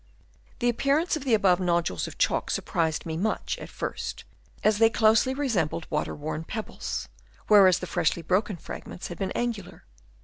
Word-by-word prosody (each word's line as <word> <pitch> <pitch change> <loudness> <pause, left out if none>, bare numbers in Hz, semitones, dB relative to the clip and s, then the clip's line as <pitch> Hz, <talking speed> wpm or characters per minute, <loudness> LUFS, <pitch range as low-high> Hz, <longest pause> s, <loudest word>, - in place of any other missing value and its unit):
The 240 - 0
appearance 280 +8 +1
of 295 -3 -5
the 240 -4 +4
above 190 -4 +3
nodules 170 - 0
of - - -10
chalk - - +1
surprised 160 -2 -1
me 160 -1 -3
much 215 +5 -1
at - - -8
first, - - -5 0.4
as 215 0 +3
they 225 0 +6
closely 225 +3 +3
resembled 195 - -1
water 150 -1 -1
worn 155 +2 -4
pebbles, 215 +6 -5 0.4
whereas 195 -4 +7
the - - -5
freshly 170 -1 0
broken 185 +3 0
fragments 175 - -8
had 175 - -8
been 195 - -1
angular. 230 -6 -4
195 Hz, 165 wpm, -27 LUFS, 170-225 Hz, 0.4 s, whereas